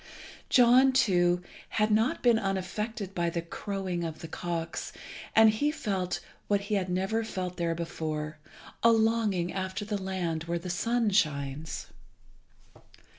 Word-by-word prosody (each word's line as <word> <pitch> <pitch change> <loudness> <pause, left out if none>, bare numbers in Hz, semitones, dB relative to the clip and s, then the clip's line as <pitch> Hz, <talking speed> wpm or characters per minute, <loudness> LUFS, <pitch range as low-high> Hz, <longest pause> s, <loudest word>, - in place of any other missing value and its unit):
John, 255 +2 +6
too, 180 -7 +3 0.3
had 215 0 +3
not 220 +4 +2
been 235 -3 +5
unaffected 195 +1 -3
by 170 -2 0
the 170 0 -3
crowing 185 0 -3
of 160 -2 -4
the 165 - -6
cocks, 165 0 -4 0.4
and 220 0 +8
he 255 +8 +1
felt 195 - -2 0.3
what 205 -1 +2
he 200 +1 -4
had 190 -3 0
never 195 +5 0
felt 185 -5 -4
there 170 -1 0
before, 155 -2 -4 0.4
a 230 - +6
longing 220 -6 +2
after 190 +2 -3
the 205 -2 -3
land 175 -4 -2
where 170 +1 -1
the 175 +1 -4
sun 230 +4 +1
shines. 150 -4 0
190 Hz, 140 wpm, -29 LUFS, 170-220 Hz, 0.4 s, and